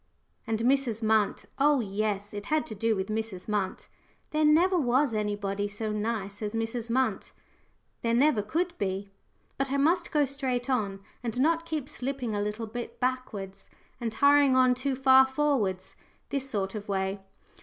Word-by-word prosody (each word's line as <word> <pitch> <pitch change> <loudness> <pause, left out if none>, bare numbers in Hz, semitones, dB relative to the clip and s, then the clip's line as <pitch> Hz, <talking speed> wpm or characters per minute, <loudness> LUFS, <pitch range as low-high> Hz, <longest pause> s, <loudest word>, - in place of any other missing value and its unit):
And 225 0 -1
Mrs. 245 -3 +1
Munt! 220 -1 +2
oh, 290 0 +4
yes, 205 -1 -2
it 205 0 -6
had 310 0 +1
to - - -6
do 225 +2 +1
with 190 -1 -2
Mrs. 215 -4 -3
Munt. 205 -3 -2 0.4
There 305 0 +1
never 335 +5 +5
was 260 -1 +2
anybody 205 -1 -1
so 210 +1 -4
nice 210 -1 -3
as 210 +1 -3
Mrs. 225 +1 -2
Munt 260 +3 0 0.7
there 230 0 +1
never 260 -3 +4
could 340 - -1
be! 195 0 -2 0.5
But 275 -1 0
I 280 - +1
must 340 +5 +2
go 295 -2 +3
straight 265 -2 -2
on, 200 -6 -1 0.2
and 240 0 -3
not 330 +4 +2
keep 310 -5 -3
slipping 255 -4 -3
a 205 - -1
little 210 +2 -3
bit 240 +2 -7
backwards, 205 -7 -3 0.3
and 235 -2 -2
hurrying 280 +1 +5
on 255 -1 +5
too 260 +2 -1
far 265 0 +6
forwards, 265 -10 0 0.4
this 270 -1 -2
sort 195 -5 -2
of 210 -2 -7
way. 195 0 -1
230 Hz, 165 wpm, -28 LUFS, 205-275 Hz, 0.7 s, far